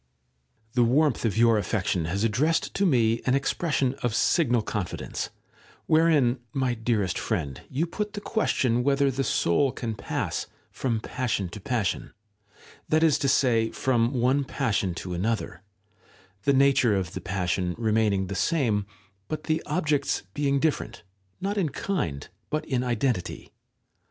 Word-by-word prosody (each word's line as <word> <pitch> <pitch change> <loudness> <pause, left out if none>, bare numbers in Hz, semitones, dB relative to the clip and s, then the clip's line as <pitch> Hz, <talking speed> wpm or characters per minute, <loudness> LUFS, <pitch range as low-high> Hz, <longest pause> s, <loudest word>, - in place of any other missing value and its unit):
§ - - -45
1. - - -44 0.7
The 120 -1 +3
warmth 145 -3 +2
of 110 -1 0
your 115 -1 +5
affection 90 -5 -1
has 95 +6 -1
addressed 140 +9 +1
to 200 - +2
me 115 -6 +2
an 130 - +4
expression 140 -1 0
of 120 -2 0
signal 120 -4 +2
confidence, 105 -5 -4 0.6
wherein, 155 -6 +3
my 130 -3 +1
dearest 110 -5 0
friend, 70 -2 -3
you 145 +6 0
put 210 +4 -4
the 205 - -4
question 130 - +1
whether 140 0 +2
the 135 +1 -1
soul 130 +5 +2
can 115 -3 -4
pass 100 - -3 0.2
from 115 -4 -1
passion 115 -9 -2
to 105 - -8
passion; 115 -1 -2 0.8
that 155 +1 +3
is 155 -4 +4
to 140 - 0
say, 120 -4 +3
from 120 -2 +1
one 130 +3 +2
passion 105 - -1
to 90 0 -5
another, 95 -1 -2 0.8
the 140 - +4
nature 135 -5 +4
of 95 -2 -2
the - - -5
passion 90 -1 -1
remaining 110 -4 +1
the 100 - -5
same, 110 - +1 0.4
but 155 - -4
the 160 0 0
objects 150 -5 0
being 140 -1 +1
different, 155 - -1 0.4
not 200 +2 -1
in 170 -6 +1
kind, 130 - -3 0.2
but 155 - -2
in 130 -3 0
identity. 120 -5 -2
125 Hz, 150 wpm, -26 LUFS, 105-140 Hz, 0.8 s, your